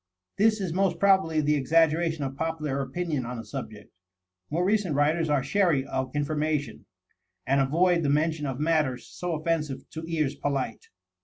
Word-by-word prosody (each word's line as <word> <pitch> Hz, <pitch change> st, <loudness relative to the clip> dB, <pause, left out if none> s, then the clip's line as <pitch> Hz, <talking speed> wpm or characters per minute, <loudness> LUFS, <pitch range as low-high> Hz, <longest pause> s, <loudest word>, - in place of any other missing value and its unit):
This 215 Hz, +1 st, +4 dB
is 185 Hz, -5 st, -2 dB
most 185 Hz, -2 st, +1 dB
probably 190 Hz, -5 st, +3 dB
the 150 Hz, 0 st, +2 dB
exaggeration 160 Hz, +2 st, +2 dB
of 135 Hz, 0 st, -4 dB
popular 155 Hz, -3 st, -2 dB
opinion 155 Hz, -1 st, -2 dB
on 125 Hz, +1 st, -5 dB
the 115 Hz, -, -7 dB
subject. 110 Hz, -3 st, -8 dB, 0.6 s
More 170 Hz, +4 st, 0 dB
recent 200 Hz, -6 st, +1 dB
writers 155 Hz, +3 st, +2 dB
are 145 Hz, -2 st, +2 dB
chary 160 Hz, -4 st, +2 dB
of 130 Hz, 0 st, -3 dB
information, 150 Hz, 0 st, -2 dB, 0.6 s
and 135 Hz, +1 st, +3 dB
avoid 170 Hz, +6 st, +3 dB
the 145 Hz, -, 0 dB
mention 150 Hz, +1 st, +1 dB
of 130 Hz, 0 st, -4 dB
matters 150 Hz, -5 st, +1 dB
so 175 Hz, -1 st, -5 dB
offensive 155 Hz, -3 st, -2 dB
to 160 Hz, -, -6 dB
ears 155 Hz, -4 st, 0 dB
polite. 140 Hz, -2 st, -3 dB
155 Hz, 160 wpm, -27 LUFS, 140-170 Hz, 0.6 s, This